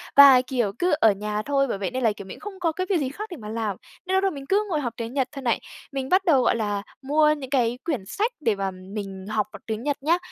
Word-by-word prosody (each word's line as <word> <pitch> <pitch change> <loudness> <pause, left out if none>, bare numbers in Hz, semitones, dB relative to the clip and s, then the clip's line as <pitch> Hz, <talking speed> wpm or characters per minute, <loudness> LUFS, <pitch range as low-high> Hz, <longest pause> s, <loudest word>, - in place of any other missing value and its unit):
Và, 275 -3 +10
kiểu, 245 -6 -1
cứ 360 - +2
ở 220 - +6
nhà 210 +1 -2
thôi, 275 -1 +2
bởi 200 - -2
vậy 195 +4 -3
nên 255 0 -2
là, 225 - +4
kiểu, 200 -1 -8
mình - - -9
cũng 415 - -6
không 380 - -14
có 335 -3 +1
cái 370 +3 -3
việc 385 - +3
gì 265 -2 -1
khác 420 +9 -7
để 345 - -6
mà 210 -2 -8
làm. 220 -4 -2 0.3
Nên 375 +1 0
lúc 380 - +3
đó 390 - +3
mình 280 -5 -7
cứ 415 +2 +3
ngồi 315 -5 0
học 240 -4 -3
tiếng 230 +1 -5
Nhật 265 -2 +1
thôi 275 - -7
này. 235 -3 +1 0.3
Mình 270 -1 -3
bắt 380 +1 +3
đầu, 285 -8 +5
gọi - - +3
là, 205 -3 -1 0.2
mua 300 +3 +4
những 265 -2 -7
cái 245 -3 +1
quyển 270 - -2
sách 430 - -1
để 225 -9 +1
mà 195 -1 -2
mình 190 +1 -7
học 215 -1 0
bằng - - -10
tiếng 220 +1 -3
Nhật 290 0 0
nhá. 335 +3 +4
260 Hz, 295 wpm, -25 LUFS, 215-305 Hz, 0.3 s, Và